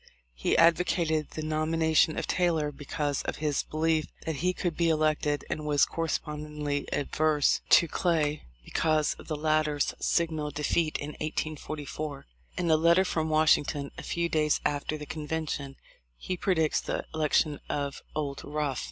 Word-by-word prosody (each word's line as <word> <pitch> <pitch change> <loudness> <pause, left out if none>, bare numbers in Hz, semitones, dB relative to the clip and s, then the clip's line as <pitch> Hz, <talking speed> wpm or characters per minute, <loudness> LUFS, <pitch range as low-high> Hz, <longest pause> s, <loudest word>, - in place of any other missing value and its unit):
He - - 0
advocated 165 -2 +3
the 155 - -3
nomination 155 0 +2
of - - -1
Taylor 165 -5 +1
because 145 0 -2
of - - -3
his 150 -2 0
belief 155 0 0 0.2
that 160 -3 -2
he 180 +5 +1
could 175 -2 -2
be 170 -1 +2
elected, 155 -2 +1
and 155 - -3
was 145 -2 +3
correspondingly 150 -2 -3
averse 150 0 +2
to 170 - +7
Clay 155 -3 0 0.2
because 155 -2 +1
of - - -12
the 155 - -2
latter's 155 -1 +1
signal 160 -3 0
defeat 150 +2 0
in 145 - -5
1844. 155 -1 -4 0.3
In 170 -2 +1
a 155 - +6
letter 170 +4 +4
from 160 -3 -1
Washington 150 -2 +2
a - - -7
few 170 0 -1
days 155 -2 +2
after 145 +1 -1
the 150 - -7
convention 150 -3 -4 0.4
he 185 - -3
predicts 170 -4 +1
the - - -3
election 155 -1 +1
of 140 -1 -3
"Old 140 -2 -3
Rough." 145 -4 -2
155 Hz, 150 wpm, -28 LUFS, 150-160 Hz, 0.4 s, to